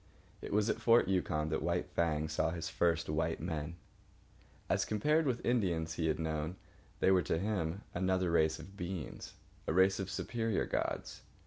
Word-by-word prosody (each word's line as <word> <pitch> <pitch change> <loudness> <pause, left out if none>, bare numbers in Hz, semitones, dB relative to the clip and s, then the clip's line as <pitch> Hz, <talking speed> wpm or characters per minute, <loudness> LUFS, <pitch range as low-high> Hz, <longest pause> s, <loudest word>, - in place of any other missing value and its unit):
It - - -6
was 105 +1 +2
at 115 +1 -1
Fort 115 0 +5
Yukon 85 -5 0
that 80 - -1
White - - 0
Fang 80 -2 +1
saw 80 +1 0
his 80 -1 -4
first 85 -1 +1
white 80 +2 0
men. 80 -1 -3 0.9
As - - +2
compared 150 +9 +2
with 125 -2 -1
the - - -3
Indians 85 -9 +1
he 80 -1 -1
had 80 - +1
known, 80 +1 -2 0.5
they 95 - +5
were 95 -1 +5
to 80 - 0
him 95 -1 -1
another 95 0 +1
race 80 -1 +3
of 95 - -11
beings, 90 -5 -5 0.3
a - - +1
race 95 +2 +4
of 95 -1 -3
superior 115 -1 -1
gods. - - -3
85 Hz, 180 wpm, -34 LUFS, 80-100 Hz, 0.9 s, Fort